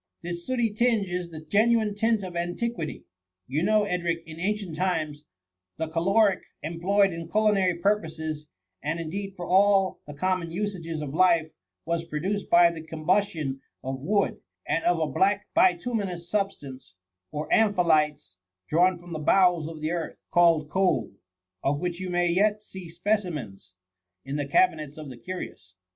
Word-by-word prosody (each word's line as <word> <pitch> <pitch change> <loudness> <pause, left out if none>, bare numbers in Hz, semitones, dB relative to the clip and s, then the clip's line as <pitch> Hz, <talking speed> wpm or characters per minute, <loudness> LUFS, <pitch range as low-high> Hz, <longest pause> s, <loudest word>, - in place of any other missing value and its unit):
This 175 +4 -5
sdbty 235 -5 0
tinge 230 -3 +2
is 175 -1 -3
the 155 -2 -8
genuine 215 +4 +3
tint 220 0 +1
of 180 -2 -7
antiquity. 175 +1 -3 0.4
You 140 +8 -1
know, 215 +3 +3
Edric, 170 -4 -1
in 160 0 -10
ancient 195 -2 -2
times, 155 -5 -1 0.5
the 160 0 -2
caloric 195 +4 +3 0.2
employed 185 +4 +2
in 165 0 -7
culinary 205 -4 +3
purposes, 160 -5 -1 0.3
and 160 +4 -2
indeed 195 +4 -5
for 175 - -6
all 195 +1 +4
the 145 - -8
conmion 185 +2 0
usages 170 -4 -3
of 145 -2 -5
life, 165 -2 +3 0.3
was 170 0 -1
produced 180 +6 -3
by 170 0 +6
the 165 -1 -7
combustion 160 -3 -1 0.2
of 130 0 -4
wood, 200 +7 +1 0.3
and 165 - 0
of 175 -1 +3
a 160 - +2
black 195 +8 +1
bituminous 180 -1 +1
substance, 145 - -3 0.4
or 150 +1 -4
amphilites, 160 - +2 0.3
drawn 180 +3 +4
from 175 0 -10
the 155 - -3
bowels 175 0 +3
of 160 -1 -8
the 155 +1 -1
earth, 170 -2 -3
called 165 -3 +4
coal, 185 - +1 0.5
of 145 +1 +1
which 175 0 -3
you 185 -1 -4
may 175 0 +2
yet 205 +4 +2
see 190 -4 -10
specimens 165 - -3 0.5
in 135 +1 -4
the 145 -1 -2
cabinets 155 - +2
of 150 -3 -8
the 125 - -10
curious. 120 - -8
175 Hz, 155 wpm, -26 LUFS, 155-200 Hz, 0.5 s, by